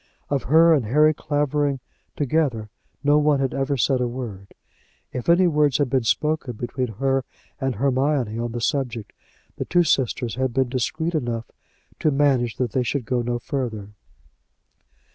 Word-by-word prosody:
Of 140 -3 0
her 165 +4 +6
and 140 -7 +2
Harry 150 +6 +4
Clavering 145 -2 0 0.4
together 135 -7 0 0.3
no 145 +1 +4
one 150 -1 +3
had 135 -1 0
ever 135 +1 -1
said 130 +1 +2
a 125 - +1
word. 115 -6 -7 0.6
If 125 +5 -3
any 175 +2 +5
words 150 -5 +3
had 140 -4 0
been 130 -4 +1
spoken 150 0 0
between 120 +1 -3
her 135 +4 0 0.4
and 135 -3 -1
Hermione 130 -2 0
on 120 0 -2
the 120 - -4
subject, 120 -5 -2 0.4
the - - -3
two 175 0 +3
sisters 130 - 0
had 130 +1 -2
been 130 -2 +2
discreet 155 +7 -2
enough 120 -7 -3 0.5
to 155 - +2
manage 135 -5 +2
that 125 -4 -1
they 130 - +1
should 125 0 -2
go 125 +1 0
no 120 0 -1
further. 120 -5 -4
135 Hz, 160 wpm, -23 LUFS, 120-145 Hz, 0.6 s, her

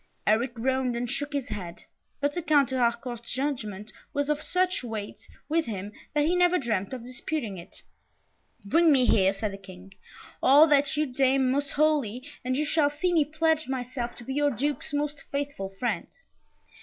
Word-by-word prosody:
Eric 235 +4 +2
groaned 260 +1 0
and 240 +1 -2
shook 290 +3 -3
his 280 -3 -3
head; 180 -5 -6 0.4
but 285 0 0
the 350 - -2
Count 290 -5 +3
de 260 - -1
Harcourt's 235 0 -1
judgment 215 -7 -3 0.2
was 285 +1 0
of 300 0 -1
such 365 -1 0
weight 220 -4 -6 0.2
with 320 -2 +1
him, 205 -2 -5 0.2
that 295 0 +3
he 345 +3 +2
never 360 0 +4
dreamt 215 - -1
of 255 -3 -6
disputing 250 - -4
it. 170 - -12 0.8
"Bring 325 +10 +4
me 260 -3 +5
here," 190 -5 +4
said 200 +1 -3
the 195 - -8
King, 190 0 -13 0.5
"all 285 +4 +8
that 290 -1 +3
you 305 - +2
deem 265 0 +2
most 280 +1 0
holy, 285 -6 +1 0.2
and 255 +1 -1
you 300 - +1
shall 300 -1 +3
see 310 +5 -1
me 320 -3 +5
pledge 315 +1 0
myself 250 -2 -4
to 240 - -11
be 265 - -5
your 290 +1 +2
Duke's 285 +5 -2
most 290 0 -2
faithful 280 -8 -3
friend." 200 -1 -2
265 Hz, 180 wpm, -27 LUFS, 230-295 Hz, 0.8 s, all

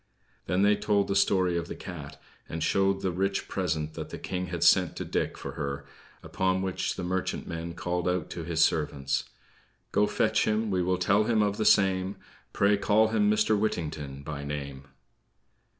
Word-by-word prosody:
They 90 +2 +1
then 105 +1 +4
told 100 -2 +1
the 100 - -1
story 95 -2 +3
of 85 - -6
the - - -6
cat, 70 -6 -8 0.3
and 80 -1 -3
showed 95 0 +2
the 95 - 0
rich 95 +2 -1
present 80 -5 -2
that - - -6
the - - -6
King 90 0 -4
had 85 -1 -2
sent - - +5
to - - -4
Dick - - -2
for - - -6
her; 70 -1 -4 0.4
upon 95 0 0
which 95 -1 -2
the 90 - -5
merchantman 85 -2 -3
called 90 +1 -1
out 90 -2 -1
to 85 - -5
his 80 -1 +2
servants: 70 -3 0 0.7
"Go - - +3
fetch - - +1
him, 110 0 0
we 95 -1 +1
will 90 +1 +1
tell 100 +4 +3
him 110 -2 +3
of 100 0 0
the 110 - -1
same; 95 -1 +3 0.4
Pray 100 0 +3
call 110 +2 +3
him 105 -2 +2
Mr. 105 0 +3
Whittington 75 -9 -3
by 70 -1 -5
name." 70 -1 -6
90 Hz, 180 wpm, -28 LUFS, 80-100 Hz, 0.7 s, sent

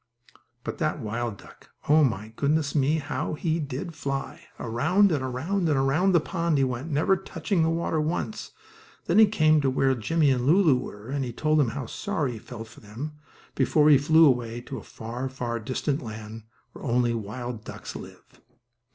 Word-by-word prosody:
But - - -5
that 155 -1 0
wild 115 -1 -3
duck! - - -17 0.2
Oh, 155 +1 +6
my, 110 -5 0
goodness 145 +2 +1
me! 145 +1 +2
How 155 +1 -3
he 160 +1 -1
did 145 +3 -4
fly. 140 -3 -5
Around 165 - +2
and 145 -4 0
around, 160 +8 -1
and 145 - +2
around 150 +9 +2
that 170 - +5
pond 170 -4 0
he 135 - +3
went, 130 +4 -2
never 160 +6 +3
touching 190 0 -2
the 160 - +3
water 165 -1 0
once. 175 +7 -3 0.6
Then - - +3
he 220 - +8
came 155 -7 +3
to 135 - +2
where 135 0 +2
Jimmie 145 +5 +2
and 125 -1 0
Lulu 165 -3 +5
were, 110 -2 -6
and 140 0 -1
he 125 - -4
told 155 +5 +1
them 135 -5 +3
how 135 +1 -5
sorry 155 - -2
he 115 - -7
felt 115 -1 -9
for 120 - -15
them, 115 +9 -7 0.4
before 150 -1 +4
he 145 - +8
flew 160 +3 +6
away 120 -4 +1
to - - -7
a - - -13
far, 120 +4 -6
far 120 -3 -3
distant 135 +5 -2
land, 110 -1 -8 0.3
where - - -11
only 120 -3 +1
wild 115 +1 -5
ducks - - -8
live. - - -10
140 Hz, 190 wpm, -26 LUFS, 120-160 Hz, 0.6 s, he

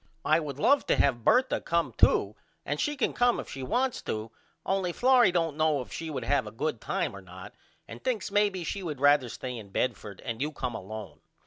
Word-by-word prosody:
I 155 - +4
would 145 -4 -5
love 280 - +3
to - - +3
have 120 -4 +2
Bertha 255 - +3
come 170 0 0
to - - +4 0.3
and - - -2
she 295 -1 0
can 265 - 0
come 245 0 +2
if - - -6
she 135 - -6
wants 250 - 0
to 110 +1 -4 0.3
only 190 -2 0
Florrie 250 -3 +5
don't 165 -4 0
know 155 -2 +2
if - - -13
she 165 - -5
would 135 -5 -4
have 130 -1 +1
a - - -7
good 130 +1 -3
time - - -2
or 100 - -9
not 95 0 -11 0.3
and 115 +2 -10
thinks 220 -6 -2
maybe 200 -3 +2
she 195 +4 -3
would 155 -7 -5
rather 145 -3 +4
stay 125 +2 -6
in 110 -4 -9
Bedford 105 -2 -3
and 115 -2 -4
you 150 +2 -1
come 125 -4 -4
alone. 105 -1 -8
145 Hz, 220 wpm, -28 LUFS, 115-190 Hz, 0.3 s, Florrie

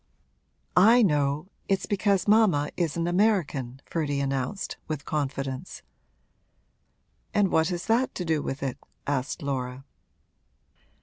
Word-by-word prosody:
'I 225 +6 +7
know 150 -1 +1 0.2
it's 195 -1 +1
because 200 -1 +1
mamma 205 -9 +4
is 170 -3 -1
an 165 - 0
American!' 175 - +1
Ferdy 145 -4 -1
announced, 135 +6 -2
with 155 -2 -4
confidence. 140 0 -3 1.5
'And 200 -3 +3
what 160 0 +3
has 175 -1 -3
that 240 +4 +1
to 180 - -3
do 160 -2 +1
with 135 0 -4
it?' 135 -2 -3 0.3
asked 140 +3 -2
Laura. 130 -1 -3
155 Hz, 120 wpm, -27 LUFS, 140-190 Hz, 1.5 s, I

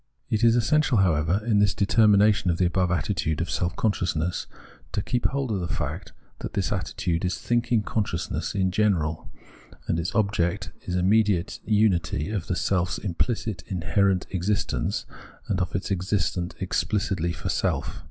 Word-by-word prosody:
It 110 0 +1
is 115 0 +6
essential, 130 +2 +3
however, 90 +1 +2
in 110 -3 +3
this 100 -1 +3
determination 105 -1 +4
of 85 - +1
the 90 - +2
above 90 +1 +1
attitude 80 -2 -1
of 85 -1 -2
self 90 0 -1
consciousness 90 -6 -1 0.5
to - - 0
keep 120 -1 0
hold 135 -3 -2
of 100 - 0
the 85 - -3
fact - - -4 0.3
that - - -6
this 100 - 0
attitude 90 -3 -2
is 90 0 -1
thinking 120 -2 +1
consciousness 100 -3 -2
in 95 -2 +1
general, 90 -7 0 0.6
that 80 - 0
its 85 +3 -3
object 100 -5 0 0.2
is 90 - -1
immediate 100 0 +2
unity 95 -7 +1
of 100 -6 -3
the 90 - 0
self's 90 -1 0
im 95 -5 -4
phcit, 110 -3 -1
inherent 90 +2 +1
existence, 95 +2 -1 0.4
and 95 -2 0
of 90 0 -2
its 95 +1 -2
existence 90 -2 -1
explicitly 95 -5 0
for - - -5
self. - - -1
95 Hz, 160 wpm, -25 LUFS, 85-105 Hz, 0.6 s, is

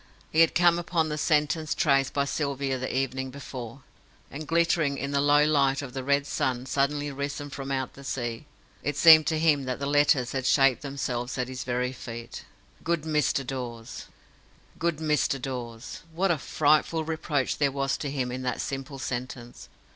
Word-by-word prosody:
He 160 - +1
had 165 - +4
come 175 0 +4
upon 170 -2 0
the 150 - -2
sentence 150 0 +1
traced 135 -3 +2
by 140 -1 0
Sylvia 140 -2 -2
the 130 - -3
evening 130 0 -2
before, 130 -2 -8 0.5
and 150 +2 -7
glittering 165 -3 +2
in 140 +1 -3
the 140 0 +2
low 145 +1 +5
light 140 -2 +2
of 130 -3 -8
the 130 -1 -4
red 140 +1 +2
sun 130 -3 -1
suddenly 145 +2 0
risen 140 +1 -5
from 135 0 -6
out 130 -2 -2
the 140 - -13
sea, 120 0 -4 0.3
it 145 -1 -2
seemed 160 0 +8
to 160 - +1
him 155 -4 +2
that 130 -1 -2
the 140 - -4
letters 145 -3 +3
had 130 -1 -2
shaped 135 -2 +4
themselves 130 -3 -3
at 125 -1 -1
his 130 0 -5
very 125 +1 -1
feet, 115 -2 -8 0.4
GOOD 170 -2 0
MR. 150 -3 0
DAWES. 120 -3 -6 0.7
"Good 170 -2 0
Mr. 150 -3 +1
Dawes"! 125 -2 -6 0.2
What 190 +2 +2
a 160 - 0
frightful 155 +4 +2
reproach 155 -4 -1
there 140 -2 +2
was 135 0 -1
to 145 - -4
him 130 -3 -2
in 130 +1 -4
that 125 -1 -2
simple 135 +1 -4
sentence! 125 -2 -6
140 Hz, 180 wpm, -27 LUFS, 130-150 Hz, 0.7 s, seemed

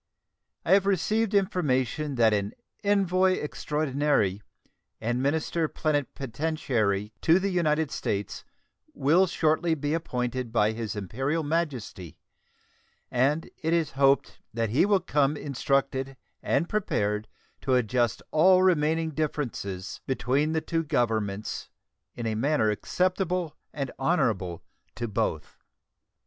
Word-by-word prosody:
I - - 0
have 195 0 +5
received 210 +3 +1
information 150 - 0
that 115 -3 +4
an 100 0 -1 0.3
envoy 190 -2 +3
extraordinary 145 - 0 0.6
and 120 +3 -1
minister 160 +3 0
plenipotentiary 135 -8 -1
to 165 +2 +5
the 195 +1 0
United 160 -4 +1
States 100 0 -3 0.5
will 175 - +4
shortly 160 0 +1
be 145 0 -2
appointed 125 -6 -2
by 110 -2 +3
His 110 -2 -4
Imperial 135 - -2
Majesty, 130 - -3 0.9
and 145 +6 +1
it 160 +1 0
is 165 -3 +1
hoped 135 0 +2 0.2
that 115 -2 -1
he 140 - +3
will 200 -2 +3
come 145 -3 +1
instructed 135 -1 -1 0.2
and 145 +5 +1
prepared 105 - -1 0.3
to 130 -1 +2
adjust 120 -2 +1
all 185 +4 +5
remaining 160 -2 +2
differences 120 -12 -3
between 135 +5 +1
the 160 - +1
two 165 0 -1
Governments 110 -7 -1 0.5
in 120 - -5
a 110 - 0
manner 115 -1 +2
acceptable 180 - -1 0.2
and 140 -3 -4
honorable 110 - 0 0.3
to 120 - -3
both. 105 - -2
145 Hz, 115 wpm, -27 LUFS, 115-165 Hz, 0.9 s, have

